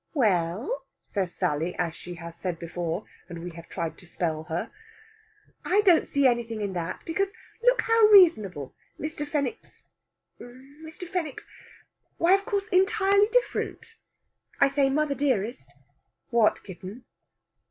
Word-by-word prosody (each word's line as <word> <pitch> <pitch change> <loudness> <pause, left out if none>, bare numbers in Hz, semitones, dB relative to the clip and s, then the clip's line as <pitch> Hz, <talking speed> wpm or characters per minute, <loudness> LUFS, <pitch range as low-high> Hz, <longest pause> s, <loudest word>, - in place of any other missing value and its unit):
"We 265 -6 +3
e - - +6 0.3
ll," 270 +5 -5 0.2
says 190 -4 -3
Sally, 170 -1 -1
as 170 -2 -2
she 175 0 -8
has 170 -1 -8
said 175 0 -4
before, 170 +2 -4 0.2
and 170 - -7
we 175 - -5
have 170 0 -12
tried 165 - -4
to 175 - -15
spell 160 -2 -2
her. 170 +8 -3 0.9
"I 400 +3 +3
don't 360 -6 +4
see 280 -1 +1
anything 235 -3 +1
in 200 -2 -3
that, 175 0 -4
because, 390 +4 -1 0.3
look - - +4
how 455 -1 +5
reasonable! 215 - +5 0.3
Mr. 305 -1 -4
Fenwick's... 295 +9 -4 0.6
Mr. 285 +8 -11
Fenwick's... 340 -5 -4 0.7
why, 340 +3 +4
of 395 0 +2
course, 405 -3 -1
entirely 400 +1 +4
different. 485 -2 -1 0.6
I 280 - +5
say, 275 0 +2
mother 295 +1 +1
dearest...." 225 - -1 0.6
"What, 230 -2 +3
kitten?" 190 +5 -9
255 Hz, 140 wpm, -27 LUFS, -, 0.9 s, e